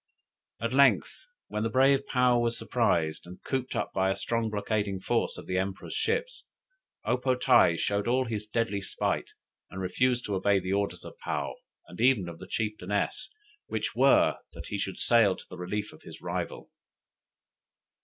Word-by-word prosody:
At 115 Hz, +2 st, -2 dB
length, 140 Hz, -, +3 dB, 0.2 s
when 105 Hz, -, -3 dB
the 115 Hz, -, 0 dB
brave 135 Hz, +3 st, +3 dB
Paou 125 Hz, -1 st, +4 dB
was 115 Hz, 0 st, 0 dB
surprised 85 Hz, -10 st, 0 dB
and 90 Hz, +1 st, -10 dB
cooped 130 Hz, -1 st, -2 dB
up -, -, -2 dB
by 95 Hz, 0 st, +2 dB
a 95 Hz, -, +1 dB
strong 115 Hz, -1 st, -1 dB
blockading 105 Hz, -2 st, -1 dB
force -, -, 0 dB
of -, -, -9 dB
the 95 Hz, 0 st, 0 dB
Emperor's 95 Hz, 0 st, -4 dB
ships, 470 Hz, +3 st, -1 dB, 0.6 s
O 125 Hz, -, +2 dB
po 130 Hz, 0 st, +1 dB
tae 125 Hz, -9 st, +5 dB
showed 100 Hz, +4 st, 0 dB
all 130 Hz, +2 st, +2 dB
his 110 Hz, -3 st, -4 dB
deadly 110 Hz, -2 st, -1 dB
spite, 95 Hz, -, -2 dB, 0.4 s
and 95 Hz, -, -7 dB
refused 120 Hz, +7 st, +1 dB
to 105 Hz, -, -3 dB
obey 100 Hz, +1 st, +3 dB
the 95 Hz, 0 st, -2 dB
orders 100 Hz, 0 st, -1 dB
of -, -, -11 dB
Paou, -, -, -2 dB, 0.3 s
and 90 Hz, -, -8 dB
even 120 Hz, -7 st, +4 dB
of 85 Hz, -1 st, -8 dB
the -, -, -9 dB
chieftainess, 105 Hz, -, -2 dB, 0.4 s
which 110 Hz, -1 st, -3 dB
were, 135 Hz, +3 st, +4 dB
that -, -, -9 dB
he 100 Hz, -, -3 dB
should 95 Hz, -1 st, -3 dB
sail 110 Hz, -5 st, +4 dB
to -, -, -13 dB
the 90 Hz, -, -10 dB
relief 105 Hz, +4 st, -3 dB
of 80 Hz, -, -16 dB
his -, -, -11 dB
rival. -, -, -5 dB
110 Hz, 175 wpm, -29 LUFS, 95-125 Hz, 0.6 s, tae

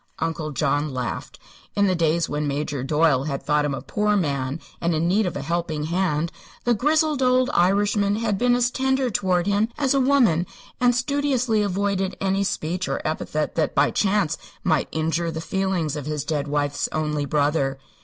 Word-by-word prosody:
Uncle 165 Hz, -1 st, -2 dB
John 145 Hz, 0 st, 0 dB
laughed. 125 Hz, -2 st, -4 dB, 0.4 s
In 205 Hz, -, +3 dB
the 190 Hz, -, +2 dB
days 165 Hz, -1 st, +1 dB
when 150 Hz, 0 st, -2 dB
Major 145 Hz, -1 st, -2 dB
Doyle 150 Hz, -1 st, +2 dB
had 140 Hz, -3 st, -3 dB
thought 150 Hz, 0 st, +2 dB
him 140 Hz, -2 st, -1 dB
a -, -, -7 dB
poor 210 Hz, 0 st, +1 dB
man 140 Hz, -4 st, -1 dB, 0.2 s
and 170 Hz, -1 st, +1 dB
in 160 Hz, +2 st, +1 dB
need 200 Hz, +3 st, +2 dB
of 175 Hz, -, -3 dB
a -, -, -4 dB
helping 160 Hz, -1 st, -2 dB
hand, 170 Hz, -1 st, 0 dB, 0.3 s
the 240 Hz, -, +3 dB
grizzled 300 Hz, +4 st, +2 dB
old 255 Hz, 0 st, +3 dB
Irishman 200 Hz, +2 st, +2 dB
had 220 Hz, -2 st, 0 dB
been 245 Hz, 0 st, +3 dB
as 245 Hz, 0 st, +2 dB
tender 265 Hz, -1 st, 0 dB
toward 180 Hz, -3 st, +1 dB
him 205 Hz, +2 st, +2 dB
as 280 Hz, -3 st, +2 dB
a 275 Hz, -, +3 dB
woman 240 Hz, -, +3 dB, 0.3 s
and 245 Hz, -1 st, +3 dB
studiously 250 Hz, -3 st, +1 dB
avoided 195 Hz, -1 st, -1 dB
any 195 Hz, 0 st, +1 dB
speech 180 Hz, -1 st, -2 dB
or -, -, -1 dB
epithet 155 Hz, -1 st, -2 dB
that 160 Hz, -, 0 dB
by -, -, +3 dB
chance 195 Hz, -6 st, +1 dB, 0.2 s
might 155 Hz, -6 st, +1 dB
injure 165 Hz, +2 st, -1 dB
the 160 Hz, -1 st, -4 dB
feelings 180 Hz, -4 st, -1 dB
of 145 Hz, -1 st, -5 dB
his 150 Hz, -2 st, -3 dB
dead 150 Hz, -2 st, -1 dB
wife's 145 Hz, 0 st, -1 dB
only 150 Hz, -2 st, -1 dB
brother. 145 Hz, -2 st, +1 dB
170 Hz, 185 wpm, -23 LUFS, 150-210 Hz, 0.4 s, In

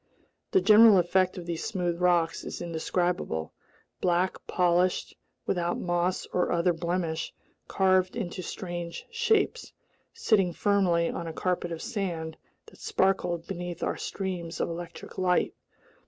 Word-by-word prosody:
The 385 Hz, -, +3 dB
general 215 Hz, -, +8 dB
effect 185 Hz, +1 st, +2 dB
of 175 Hz, -, -6 dB
these 170 Hz, -1 st, -3 dB
smooth 175 Hz, -4 st, -2 dB
rocks 175 Hz, -2 st, +2 dB
is -, -, -6 dB
indescribable: 170 Hz, -, -2 dB, 0.5 s
black, 180 Hz, +1 st, +1 dB
polished, 180 Hz, 0 st, +1 dB, 0.3 s
without 175 Hz, -1 st, 0 dB
moss 175 Hz, +1 st, 0 dB
or 180 Hz, -, +1 dB
other 175 Hz, +1 st, +2 dB
blemish, 170 Hz, -1 st, -2 dB, 0.4 s
carved 185 Hz, 0 st, +2 dB
into 185 Hz, -5 st, -4 dB
strange 175 Hz, -1 st, -6 dB
shapes, 465 Hz, 0 st, +1 dB, 0.4 s
sitting 195 Hz, -6 st, +2 dB
firmly 185 Hz, -5 st, +2 dB
on 170 Hz, -, -5 dB
a 165 Hz, -, -5 dB
carpet 175 Hz, 0 st, -1 dB
of 165 Hz, -, -5 dB
sand 180 Hz, -9 st, -3 dB, 0.3 s
that -, -, -17 dB
sparkled 180 Hz, -3 st, 0 dB
beneath 175 Hz, -2 st, -5 dB
our -, -, 0 dB
streams 180 Hz, -4 st, -4 dB
of -, -, 0 dB
electric 170 Hz, +2 st, -7 dB
light. 180 Hz, -1 st, +2 dB
180 Hz, 130 wpm, -28 LUFS, 170-190 Hz, 0.5 s, general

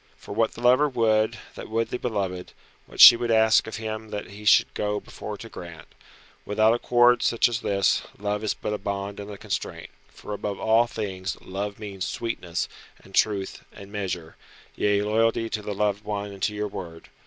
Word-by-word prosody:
For -, -, -9 dB
what 115 Hz, +1 st, +1 dB
the 115 Hz, -, -10 dB
lover 130 Hz, +5 st, +5 dB
would, 110 Hz, -4 st, +2 dB, 0.2 s
that -, -, -9 dB
would 115 Hz, +1 st, -1 dB
the 125 Hz, -, -3 dB
beloved; 95 Hz, -6 st, -3 dB, 0.3 s
what -, -, -13 dB
she -, -, +12 dB
would 120 Hz, 0 st, -3 dB
ask 110 Hz, 0 st, +4 dB
of 110 Hz, -, -5 dB
him 110 Hz, 0 st, -5 dB
that 105 Hz, -, -4 dB, 0.2 s
should -, -, +7 dB
he -, -, -33 dB
go 105 Hz, 0 st, -1 dB
before 105 Hz, 0 st, -8 dB
to 115 Hz, -, -9 dB
grant. 85 Hz, -6 st, -10 dB, 0.5 s
Without 110 Hz, +2 st, +3 dB
accord 120 Hz, 0 st, +4 dB
such 115 Hz, -, +3 dB
as 115 Hz, -1 st, -3 dB
this, 100 Hz, -2 st, +2 dB, 0.2 s
love 105 Hz, +1 st, -2 dB
is 110 Hz, -, 0 dB
but 105 Hz, -, -4 dB
a 105 Hz, -, -3 dB
bond 100 Hz, 0 st, -4 dB
and 100 Hz, 0 st, -7 dB
a 100 Hz, -, -8 dB
constraint. -, -, -5 dB, 0.2 s
For 105 Hz, -, -9 dB
above 100 Hz, -1 st, -4 dB
all 115 Hz, +2 st, +3 dB
things 95 Hz, -6 st, -4 dB
Love 100 Hz, +2 st, -5 dB
means 100 Hz, -4 st, -5 dB
sweetness, 90 Hz, -7 st, -3 dB, 0.4 s
and 95 Hz, -, -17 dB
truth, 100 Hz, -2 st, 0 dB
and 100 Hz, -1 st, -12 dB
measure; 90 Hz, -6 st, -4 dB, 0.4 s
yea, 105 Hz, 0 st, +1 dB
loyalty 115 Hz, +1 st, +1 dB
to 110 Hz, -, -2 dB
the 105 Hz, -1 st, -5 dB
loved 105 Hz, 0 st, 0 dB
one 105 Hz, -1 st, -4 dB
and 100 Hz, -1 st, -11 dB
to 105 Hz, +2 st, 0 dB
your 105 Hz, 0 st, -2 dB
word. 85 Hz, -4 st, -9 dB
105 Hz, 195 wpm, -25 LUFS, 100-110 Hz, 0.5 s, she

